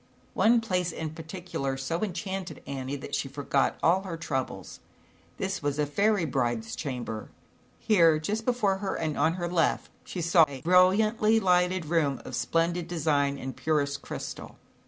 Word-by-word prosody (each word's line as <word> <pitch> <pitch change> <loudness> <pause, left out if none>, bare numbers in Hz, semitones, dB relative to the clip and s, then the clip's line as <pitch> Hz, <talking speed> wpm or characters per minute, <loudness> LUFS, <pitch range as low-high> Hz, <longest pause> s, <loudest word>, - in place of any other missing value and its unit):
One 230 +1 +4
place 180 -5 -1
in 160 -1 -5
particular 160 -4 -4
so 165 +6 -3
enchanted 190 -1 -4
Annie 135 0 -4
that 145 0 -8
she 140 - -1
forgot 140 0 0
all 180 +3 +4
her 185 -4 -6
troubles. 130 - -4 0.6
This - - -2
was 145 0 -1
a 150 - +2
fairy 200 +5 +2
bride's 120 -5 -1
chamber. 120 -6 -5 0.5
Here, 170 -8 +4
just 210 +9 -2
before 220 -6 +1
her 195 -1 -3
and 155 -2 -2
on 160 - +2
her 175 -1 -3
left, 170 -1 0
she 185 - -6
saw 170 -1 +5
a 135 -2 -8
brilliantly 210 - +4
lighted 180 -2 +2
room 150 -4 +1
of - - -5
splendid 170 +1 0
design 145 -4 +1
and 130 -1 -6
purest 145 -3 0
crystal. - - -7
165 Hz, 155 wpm, -28 LUFS, 140-185 Hz, 0.6 s, saw